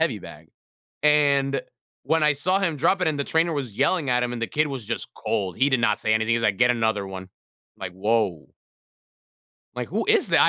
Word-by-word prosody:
heavy - - +1
bag. - - -12 0.5
And, 140 -2 +3 0.4
when 160 +3 +1
I 150 0 +4
saw 180 +7 +1
him 175 -6 0
drop 185 +7 +2
it 175 - +2
and 150 -2 -2
the 140 - -1
trainer 165 +1 +1
was 130 -8 -4
yelling 145 +3 +1
at 125 0 +2
him 125 0 -2
and 120 - -5
the 115 - -1
kid 155 +6 0
was 135 -6 -6
just 115 - -4
cold, 95 -5 -2
he 135 +2 +4
did 130 -3 +1
not 105 -2 +2
say 110 - +1
anything. 110 +1 +1
He's 115 - -1
like, 100 -4 +1
"Get 125 -1 +4
another 110 -4 0
one," 95 -1 -8 0.5
like, 90 - -6
woah 100 -4 -1 1.2
like, - - -4
who - - -1
is - - +3
that, - - +4
I - - +6
125 Hz, 225 wpm, -24 LUFS, 110-150 Hz, 1.2 s, I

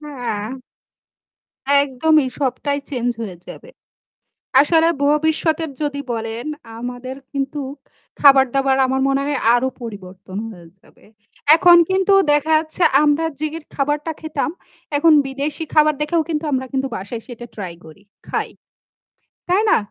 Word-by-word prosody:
হ্যাঁ। 245 -8 -5 1.3
একদমই 290 +2 +2
সবটাই 285 +1 -1
চেঞ্জ 245 -2 -1
হয়ে 200 -6 -5
যাবে। 485 - -11 0.9
আসলে 325 +3 +4 0.2
ভবিষ্যতের 315 +1 +1
যদি 290 -1 -2
বলেন 225 +1 -4 0.3
আমাদের 250 +2 -6 0.2
কিন্তু 275 +1 -3 0.6
খাবার-দাবার 270 -1 +5
আমার 265 +1 0
মনে 275 0 +1
হয় 290 -1 -1 0.2
আরও 245 +2 +1
পরিবর্তন 190 -4 -9
হয়ে 175 -5 -13
যাবে। - - -24 0.5
এখন 345 +1 +7
কিন্তু 380 +1 +3 0.2
দেখা 295 +2 +1
যাচ্ছে 315 +3 -4 0.2
আমরা 300 +2 +2 0.2
যে 310 - 0 0.3
খাবারটা 295 +3 -1
খেতাম 305 -3 -2 0.5
এখন 320 +3 +5
বিদেশি 280 +4 -3
খাবার 305 -1 +5
দেখেও 325 +2 +1
কিন্তু 315 -1 -2
আমরা 260 -1 -1
কিন্তু 270 0 -1
বাসায় 205 +5 -6
এসে 250 - -11 0.2
ট্রাই 185 -5 -6
করি 160 +5 -15 0.3
খাই - - -2 1.0
তাই 370 +3 +3
না? - - +5
280 Hz, 125 wpm, -20 LUFS, 245-310 Hz, 1.3 s, এখন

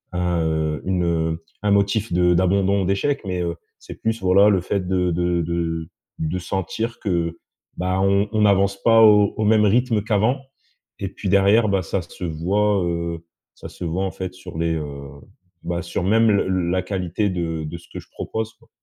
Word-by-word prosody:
un, 90 -1 0
heu, 80 -2 -1
une, 95 -1 0
heu, 80 -1 -1 0.2
un 105 - +2
motif 100 +1 +1
de 90 0 +3
d'abandon 95 +2 +2
ou - - -2
d'échecs. 100 +10 0
Mais, 90 -2 -2
heu, 85 -1 -2 0.2
c'est - - -10
plus, 110 -1 -1
voilà, 95 +3 +5
le 95 -3 +2
fait 95 0 -2
de 90 -1 +1
de 85 0 0
de 80 -1 -2 0.3
de 80 +3 -2
sentir 95 +6 -3
que, 85 -4 -2 0.4
bah, 95 +1 -1
on 100 +1 +2
on 110 -1 +2
avance 100 0 +2
pas 115 -1 +6
au 105 -2 +6
au 110 - 0
même 105 0 +4
rythme 115 0 +2
qu'avant 110 +5 +1 0.6
et 100 - -3
puis, 100 +1 -5
derrière, 100 +3 +4
bah, 100 -1 +1
ça 90 +3 -2
se 85 - -11
voit, 95 +5 +1
heu, 85 -1 -3 0.3
ça - - -10
se - - -10
voit, 90 +4 -1
en 95 - -3
fait, 95 -1 -6
sur 90 -3 -10
les 85 0 0
heu, 70 -3 -6 0.5
bah, 85 0 -2
sur, 85 - -3
même, 110 +4 +4
le 100 -2 +2 0.2
la 95 0 +1
qualité 95 +1 -2
de 85 -3 -3
de 80 +3 -6
ce - - -19
que - - -5
je - - -14
propose, 110 0 -4
quoi. - - -26
95 Hz, 200 wpm, -22 LUFS, 85-100 Hz, 0.6 s, pas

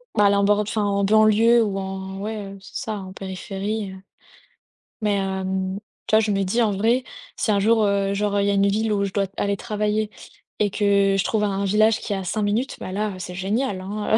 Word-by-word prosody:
Bah, 210 -1 +4
aller 200 0 +3
en 200 - +3
bord 205 0 +3
enfin 210 0 -1
en 200 0 +1
banlieue 215 +3 +5
ou 200 -3 -1
en 190 0 -5
ouais, 215 +2 -4 0.2
heu, - - -10
c'est - - -8
ça 220 - -2
en 190 -1 -8
périphérie, 195 +2 -4
heu, 190 - -10 1.0
mais, 210 -1 +1
hem, 190 0 -2 0.3
tu 215 - +3
vois 220 - +6
je 215 -1 0
me 195 0 +1
dis 230 +6 +1
en 215 -2 +3
vrai, 230 +6 +1 0.3
si 215 - 0
un 200 - +3
jour, 220 +2 +3
heu, 200 0 +1
genre, 205 0 0
il 200 - +1
y - - +3
a - - +2
une 200 0 +3
ville 215 +1 +1
où 200 -1 +1
je 195 - -2
dois 200 0 +1
aller 200 -1 -1
travailler 210 0 -1 0.5
et 205 -1 +2
que 200 -2 +3
je - - +3
trouve 215 -2 +1
un 200 -1 0
village 215 +3 +3
qui 205 - -4
est - - 0
à 190 - -3
5 205 +4 -2
minutes, 225 +6 -1
bah, 185 - -6
là, 210 +1 -1
heu, - - -10
c'est 180 0 -6
génial, 200 +1 -1
hein, 210 +3 -1
heu. - - +5
200 Hz, 245 wpm, -23 LUFS, 195-215 Hz, 1.0 s, vois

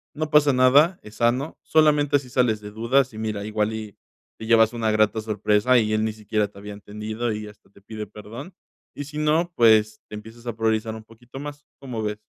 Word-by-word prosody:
No 155 +1 -3
pasa 150 -2 +5
nada, 140 +8 +4
es 105 +1 -13
sano. 125 +5 0
Solamente 150 -2 +3
si 130 -2 -13
sales 120 -4 +1
de 105 0 -9
dudas, 125 +4 +1
y - - -10
mira, 105 -2 -3
igual 110 0 -1
y 110 -3 -7 0.4
te 110 - -7
llevas 115 -1 +5
una 115 -2 -1
grata 110 0 +2
sorpresa, 105 +3 +2
y 110 -1 0
él 110 0 +1
ni 110 - -2
siquiera 105 -1 -1
te 100 - -20
había 105 +1 -8
entendido 105 +3 -5
y 105 0 -6
hasta 105 -1 -17
te 100 - -21
pide 105 +1 -7
perdón. 115 - -10 0.4
Y 145 - -5
si 150 +2 -9
no, 155 +3 +1
pues, 110 -2 +4
te - - -9
empiezas 115 +3 -11
a 115 - -3
priorizar 110 0 -1
un 110 - -10
poquito 120 +4 -13
más. 145 +1 -8
¿Cómo 125 -5 -5
ves? 105 0 -3
110 Hz, 215 wpm, -23 LUFS, 105-130 Hz, 0.4 s, pasa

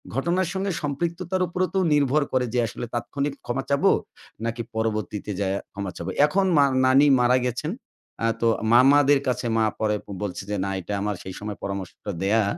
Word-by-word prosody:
ঘটনার 170 +7 +1
সঙ্গে 195 0 -1
সম্পৃক্ততার 170 +5 -2
উপরও 180 +2 -1
তো - - +3
নির্ভর 145 0 +3
করে 130 -1 +2
যে 125 - +2
আসলে, 115 - -6
তাৎক্ষণিক 140 +4 -2
ক্ষমা 130 +3 -2
চাবো, 140 0 +4 0.5
নাকি 115 +1 -2
পরবর্তীতে 105 -2 -2
যাইয়া 100 0 0
ক্ষমা 100 -2 -4
চাবো? - - -5 0.2
এখন 190 +6 +1
মা 140 - +6 0.2
নানি 135 +3 +6
মারা 125 +1 +4
গেছেন। 125 +7 -2 0.5
আ - - +3 0.2
তো 115 - +3 0.3
মামাদের 140 +3 +6
কাছে 125 0 -1
মা 110 - +3
পরে 105 -1 +1 0.3
বলছে 100 -2 -4
যে, 105 - -1
"না, 100 - -2
এটা 100 - -5
আমার 105 0 -1
সেই 95 - -7
সময় 105 -1 -5
পরামর্শটা 100 +1 -5
দেওয়া, 110 +3 +3
125 Hz, 175 wpm, -24 LUFS, 105-145 Hz, 0.5 s, মা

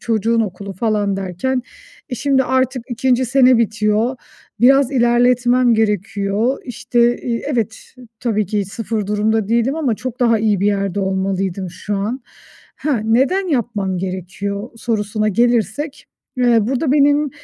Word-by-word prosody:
çocuğun 230 0 +1
okulu 200 -1 -4
falan 205 0 0
derken, 195 +8 -2 0.5
eee, - - -2
şimdi 265 +2 +2
artık 260 -1 0
2. 255 +1 +1
sene 255 -1 +4
bitiyor. 220 +2 +1 0.4
Biraz 270 +2 +5
ilerletmem 245 0 +3
gerekiyor. 210 +2 0
İşte, 240 0 +1
iii 235 -1 -2
Evet, 225 -3 -1 0.4
tabii 215 -4 0
ki 205 +1 -1
sıfır 215 +1 -4
durumda 210 0 0
değilim 235 +4 +1
ama 275 -8 0
çok 255 +2 -7
daha 230 -2 +3
iyi 210 -3 +1
bir 200 - +2
yerde 200 -1 0
olmalıydım 190 -1 -2
şu 190 +4 -4
an. 215 +7 -3 0.6
Ha, 280 -6 -1
neden 270 - +2
yapmam 215 - -1
gerekiyor 195 +4 -4
sorusuna 215 -2 -1
gelirsek, 240 +6 0 0.3
eee, 245 -2 +4
burada 265 +3 0
benim 290 0 +3
225 Hz, 135 wpm, -18 LUFS, 200-250 Hz, 0.6 s, Biraz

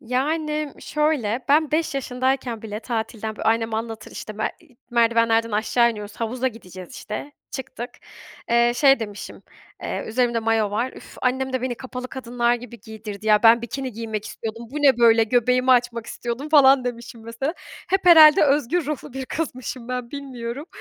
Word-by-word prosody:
Yani 300 +4 -1
şöyle, 290 -7 0
ben 305 +1 +4
5 310 -2 0
yaşındayken 255 -2 -1
bile 210 -1 -6
tatilden 220 -2 -4
bö - - -7
annem 225 0 +1
anlatır 225 0 -5
işte 215 -1 -8
be - - 0
i 285 -8 -24
merdivenlerden 230 -1 +3
aşağı 230 +3 +2
iniyoruz, 210 -2 -8
havuza 245 +3 -1
gideceğiz 185 -6 -11
işte, 280 +7 -6 0.2
çıktık. 245 -2 -6 0.6
Eee, 235 0 +4
şey 270 0 +5
demişim, 205 -2 -7 0.4
eee - - -3
üzerimde 235 +1 +1
mayo 225 -2 +1
var 235 +5 -1
"Üf, - - -13
annem 260 +1 0
de 260 -1 -1
beni 255 -1 -1
kapalı 255 0 -7
kadınlar 240 -2 0
gibi 240 -1 -9
giydirdi 215 -1 -9
ya, 210 -1 +4
ben 230 +1 +6
bikini 260 +2 -5
giymek 220 -1 -5
istiyordum. 225 +2 -7
Bu 285 - -8
ne 280 -4 +4
böyle? 230 -1 +5
Göbeğimi 250 +3 +2
açmak 240 -2 +2
istiyordum." 240 +5 -5
falan 275 -4 +6
demişim 235 -1 -6
mesela. 235 +8 -3 0.3
Hep 385 +1 0
herhâlde 310 -4 +9
özgür 295 +3 +1
ruhlu 295 -2 -5
bir 265 0 -5
kızmışım 255 -5 -5
ben, 250 -1 -4
bilmiyorum. 270 -1 -6
240 Hz, 165 wpm, -23 LUFS, 225-270 Hz, 0.6 s, herhâlde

